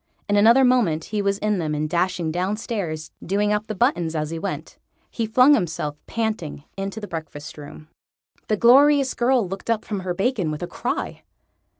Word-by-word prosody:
In 205 - +1
another 230 +6 +6
moment 215 -12 +2
he 210 +3 -2
was 200 0 0
in 210 -1 0
them 155 -2 -2
and 150 +1 -1
dashing 175 0 0
downstairs, 180 -3 -3
doing 205 +3 +1
up 210 +1 -2
the 215 - -4
buttons 175 - +1
as 155 0 -2
he 165 - -4
went. 200 - -5 0.3
He 230 -2 -2
flung 255 +6 +6
himself, 160 - -1
panting, 215 -11 -3
into 195 +2 -4
the 205 - -7
breakfast 160 -2 -7
room. 150 +1 -11 0.6
The 215 - +1
glorious 275 +4 +5
girl 245 -3 +2
looked 195 +4 -7
up 225 -2 0
from 205 -3 -3
her 185 -1 -3
bacon 195 -4 0
with 155 +2 -4
a - - -3
cry. - - -4
200 Hz, 185 wpm, -23 LUFS, 165-225 Hz, 0.6 s, another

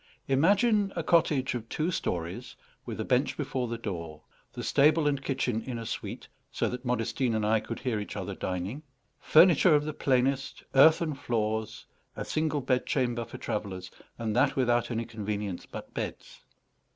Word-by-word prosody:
Imagine 200 - +3
a 170 - -2
cottage 150 -6 +2
of 115 -2 -5
two 160 +4 -1
stories, 85 - -3 0.3
with - - -5
a - - -2
bench - - +1
before 125 -2 -2
the 115 0 -3
door; 85 -8 -6 0.3
the - - -6
stable 150 +2 +4
and 140 -1 0
kitchen 130 -5 -1
in 125 -1 -5
a 115 - -6
suite, - - -5 0.2
so - - 0
that 125 0 -5
Modestine 125 0 0
and 110 -1 0
I 110 +1 +3
could - - -6
hear 125 -5 -1
each 105 - -6
other - - -4
dining; 95 +9 -4 0.4
furniture 170 0 +6
of 150 0 +2
the 155 - -3
plainest, 135 0 0
earthen 155 +3 +6
floors, 110 -4 -2 0.3
a - - -4
single 155 -2 0
bed 125 0 0
chamber 120 -2 0
for 115 - -9
travellers, 95 -3 -4 0.3
and 110 -2 -2
that 135 +3 +3
without 120 -2 +2
any 115 -1 -2
convenience 105 -4 -4
but - - -9
beds. - - -6
125 Hz, 170 wpm, -29 LUFS, 110-145 Hz, 0.4 s, furniture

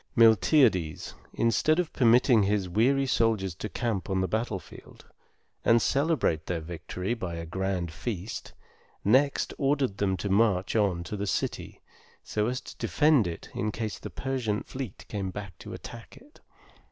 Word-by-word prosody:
Miltiades, 110 - +4 0.2
instead 115 +7 +2
of 180 -3 -1
permitting 120 -1 +5
his 100 -1 +1
weary 130 +9 +2
soldiers 110 -7 +1
to 105 +6 -6
camp 110 -8 -2
on 95 -1 +1
the 95 - +1
battlefield, 110 0 -5 0.6
and 115 0 +5
celebrate 135 - +1
their 85 -2 -1
victory 90 +5 -4
by 90 -8 -4
a 85 0 -5
grand 95 -1 -2
feast, 105 +2 -5 0.5
next 135 +7 +3
ordered 135 -7 +1
them 95 -2 +1
to 100 - -3
march 100 -1 +2
on 100 -6 +1
to 105 - -5
the 100 0 -3
city, - - -3 0.4
so 105 0 -1
as 125 +2 -1
to - - -11
defend 150 - +3
it 85 -1 -7
in 105 - -1
case 110 0 -4
the - - -7
Persian 125 -6 -2
fleet 130 -7 -7
came 95 -3 -3 0.3
to - - -9
attack 115 -1 -10
it. 295 +4 -19
105 Hz, 155 wpm, -28 LUFS, 95-125 Hz, 0.6 s, permitting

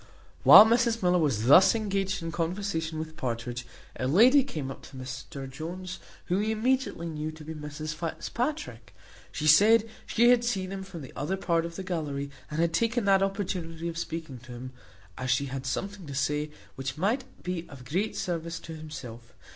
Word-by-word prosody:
While 215 - +11
Mrs 230 -1 +2
Miller 180 0 +4
was 130 -9 +1
thus 185 - +7
engaged 195 -4 -1
in 165 - -3
conversation 165 -1 -2
with 160 0 -5
Partridge, 120 -1 -4 0.3
a 130 - -2
lady 245 - +6
came 155 - -5
up - - -9
to 135 - -14
Mr 130 +1 -7
Jones, 175 +6 -6 0.3
whom 185 +3 +1
he 215 - 0
immediately 230 -6 0
knew 155 -1 -4
to 155 0 -10
be 160 +1 -6
Mrs 150 0 -5
Fitzpatrick. 240 - -4 0.4
She 155 - -4
said, 210 +9 +6 0.2
she 240 +2 +5
had 245 -1 +4
seen 195 -6 -1
him 195 0 -4
from 185 -5 -8
the 130 - -11
other 175 +7 -2
part 170 -3 +1
of 170 - -10
the 190 - -5
gallery, 145 -6 -3 0.2
and 150 - -4
had 165 0 +2
taken 230 +4 +1
that 195 -1 +5
opportunity 180 -4 -2
of 165 -1 -4
speaking 160 -6 -5
to 125 +1 -13
him, 125 +2 -7 0.5
as 125 0 -3
she 130 +3 +2
had 135 0 -5
something 195 +5 -4
to 140 - -6
say, 150 +2 0 0.2
which 135 +1 -5
might 220 - +1 0.2
be 180 -2 -3
of 135 -4 -11
great 195 +10 -1
service 165 -1 -3
to 165 - -8
himself. 125 -7 -9
165 Hz, 185 wpm, -28 LUFS, 145-195 Hz, 0.5 s, While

